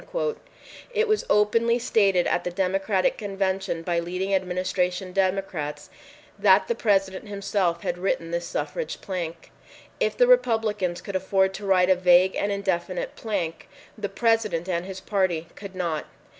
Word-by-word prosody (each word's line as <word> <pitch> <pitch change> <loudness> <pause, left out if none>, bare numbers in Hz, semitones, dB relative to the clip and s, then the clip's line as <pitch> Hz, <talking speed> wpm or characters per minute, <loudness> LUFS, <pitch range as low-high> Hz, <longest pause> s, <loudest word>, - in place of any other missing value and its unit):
It 450 +1 +2
was 430 0 +1
openly 230 +3 +3
stated 200 -7 +2
at 175 - 0
the - - -2
Democratic 190 +2 0
Convention 195 -4 -2
by 170 0 0
leading 180 +3 -2
Administration 185 0 -1
Democrats 185 -6 -2 0.5
that - - +5
the 470 - +1
President 195 - 0
himself 200 -4 -1
had 175 - -2
written 170 -3 -1
this 170 0 -2
suffrage - - -4
plank. 170 -4 -5 0.5
If - - 0
the - - +6
Republicans 220 - +2
could 200 - -6
afford 190 0 +2
to 200 +1 -6
write 185 -1 +4
a - - +6
vague 180 +1 +4
and 205 - 0
indefinite 185 -2 -2
plank, 180 -7 -4 0.3
the 210 -2 -4
President 225 -7 +1
and 175 -1 -1
his 190 -1 -7
party 185 -6 0
could 200 -2 -9
not. 170 -4 -2
190 Hz, 145 wpm, -25 LUFS, 180-205 Hz, 0.5 s, the